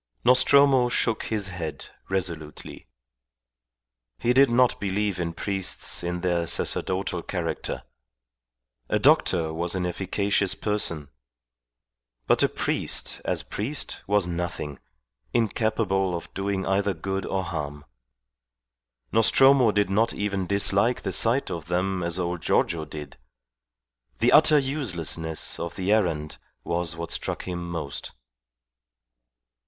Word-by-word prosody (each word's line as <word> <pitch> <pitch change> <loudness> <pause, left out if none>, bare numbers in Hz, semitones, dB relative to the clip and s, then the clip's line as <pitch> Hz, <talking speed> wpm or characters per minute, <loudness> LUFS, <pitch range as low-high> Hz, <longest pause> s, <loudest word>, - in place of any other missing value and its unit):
Nostromo 130 0 +5
shook 115 -2 0
his 105 -3 0
head 80 -6 -6 0.2
resolutely. 85 -5 -4 1.3
He 120 - +1
did 135 +2 +6
not 125 +1 +3
believe 100 -1 -1
in 85 -1 -1
priests 95 +2 0
in 90 0 -3
their 85 -2 0
sacerdotal 95 +3 -1
character. - - -4 1.1
A - - +2
doctor 80 -3 +3
was 85 +2 -2
an 90 -1 -1
efficacious 95 +2 0
person; 85 -9 -2 1.2
but - - +3
a - - +4
priest, - - 0
as - - -1
priest, 130 +9 -3
was 100 -2 +2
nothing, 85 -5 -4 0.6
incapable 105 -4 +1
of - - -11
doing 95 0 -2
either 100 0 +1
good 95 +4 -3
or 95 -1 -2
harm. 75 -3 -5 1.3
Nostromo 130 +2 +5
did 105 -1 +1
not 110 +4 +2
even 100 -3 -2
dislike 100 +5 +2
the 95 - -2
sight 115 +8 +1
of 85 -3 -5
them 90 +2 -1
as 85 0 -2
old 90 -1 -2
Giorgio 80 -2 +1
did. 75 -3 -9 1.0
The - - +3
utter 150 - +7
uselessness 90 - -2
of 85 0 -5
the 95 +1 -1
errand 80 -8 0 0.2
was 85 -1 -2
what 85 0 -6
struck - - -2
him 85 -1 -5
most. 80 -5 -5
95 Hz, 120 wpm, -25 LUFS, 85-105 Hz, 1.3 s, utter